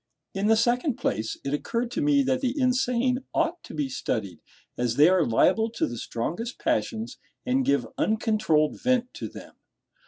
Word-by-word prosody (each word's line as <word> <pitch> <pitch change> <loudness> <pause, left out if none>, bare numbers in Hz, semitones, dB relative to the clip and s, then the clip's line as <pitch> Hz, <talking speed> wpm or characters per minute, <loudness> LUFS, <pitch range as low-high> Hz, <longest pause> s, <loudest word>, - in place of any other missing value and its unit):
In 195 +2 0
the 225 - +5
second 240 +4 +1
place, 110 +2 -2
it 140 - -3
occurred 235 +10 -2
to - - -2
me 290 -1 +3
that 260 0 0
the 265 +2 -1
insane 250 -1 +1 0.2
ought 335 +1 0
to - - -10
be 145 -2 -1
studied, 105 -8 -3 0.4
as 120 -1 -1
they 150 +4 +7
are 185 -2 +4
liable 220 - +3
to - - 0
the 120 -1 -5
strongest 175 - -4
passions, 235 -7 -2 0.3
and 260 +1 +1
give 140 - +1
uncontrolled 215 -9 +1
vent 250 -1 +1
to - - -6
them. - - -12
230 Hz, 175 wpm, -26 LUFS, -, 0.4 s, they